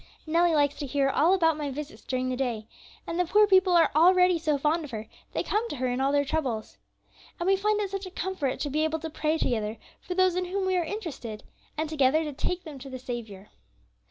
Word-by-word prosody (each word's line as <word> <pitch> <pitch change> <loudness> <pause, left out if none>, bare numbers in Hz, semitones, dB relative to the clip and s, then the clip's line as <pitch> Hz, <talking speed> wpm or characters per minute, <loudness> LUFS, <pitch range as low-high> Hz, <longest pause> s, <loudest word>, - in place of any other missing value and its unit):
Nellie 335 +1 +3
likes 290 -1 +3
to 285 - -3
hear 275 0 +1
about 350 +6 +3
all 325 0 +5
my 295 -1 -4
visits 295 +3 -7
during 255 0 -2
the 255 - -1
day, 240 -4 -2 0.4
and 335 - -3
the 360 - +3
poor 420 +5 +5
people 380 -2 +4
are 340 -1 +5
already 360 +2 +5
so 310 -3 +1
fond 310 +4 +1
of 295 - -8
her 220 -2 -6 0.3
they - - -1
come 445 +3 -1
to - - -4
her 260 -1 -2
in 250 +1 -1
all 270 +1 +2
their 285 0 +2
troubles. 265 -8 -3 0.6
And 345 - -2
we 390 +1 +4
find 420 +2 +1
it 400 -2 -2
such 390 -1 -4
a - - -7
comfort 370 -7 -3
to 290 - -2
be 305 +2 +1
able 315 0 0
to 320 0 -6
pray 310 +1 0
together 220 -6 -1 0.2
for 360 - -5
those 370 -1 +3
in 365 0 0
whom 380 +2 -2
we 375 0 +1
are 355 - +2
interested, 310 - -6 0.3
and 315 +1 -1
together 305 0 +2
to 300 -2 -4
take 360 +6 -3
them 300 -5 -9
to 270 +1 -9
the 260 - -6
Saviour. 230 -6 -7
310 Hz, 245 wpm, -27 LUFS, 270-360 Hz, 0.6 s, all